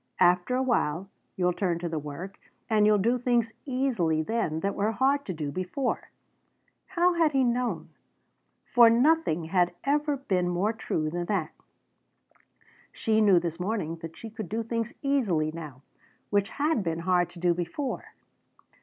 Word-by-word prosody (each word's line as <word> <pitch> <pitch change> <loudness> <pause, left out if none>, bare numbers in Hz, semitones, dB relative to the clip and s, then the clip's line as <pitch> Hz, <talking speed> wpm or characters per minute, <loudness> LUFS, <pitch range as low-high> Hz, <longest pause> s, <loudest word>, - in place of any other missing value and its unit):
After 180 +6 +3
a 260 - +1
while 195 - 0 0.2
you'll 180 -1 +1
turn 175 -2 0
to 170 0 -4
the 160 -2 -2
work, 150 +7 -8 0.3
and 215 -2 +4
you'll 210 0 +5
do 235 +5 +1
things 235 -2 +1
easily 230 - +1
then 160 -6 -1
that 200 +2 0
were 210 +2 0
hard 275 +5 +2
to 185 - -2
do 150 -2 -3
before." 185 - -3 0.8
How 360 -1 +2
had 325 -3 +2
he 270 -1 +3
known? 245 0 -1 0.8
For 235 -1 +6
nothing 245 - +3
had 175 +1 +1
ever 290 +1 +1
been 185 -10 0
more 185 +5 0
true 155 -8 -2
than 175 +1 -2
that. 175 -5 -1 1.4
She 220 -1 +1
knew 200 -4 +6
this 170 -1 -4
morning 180 -4 -2
that 165 -1 -9
she 225 - -8
could 220 -4 -7
do 225 +2 -2
things 230 0 -2
easily 200 - +1
now 150 -5 -9 0.5
which 200 -1 +2
had 295 -3 0
been 165 -2 -2
hard 175 0 +2
to 175 - -13
do 175 0 +3
before. 180 - -4
200 Hz, 165 wpm, -27 LUFS, 170-245 Hz, 1.4 s, For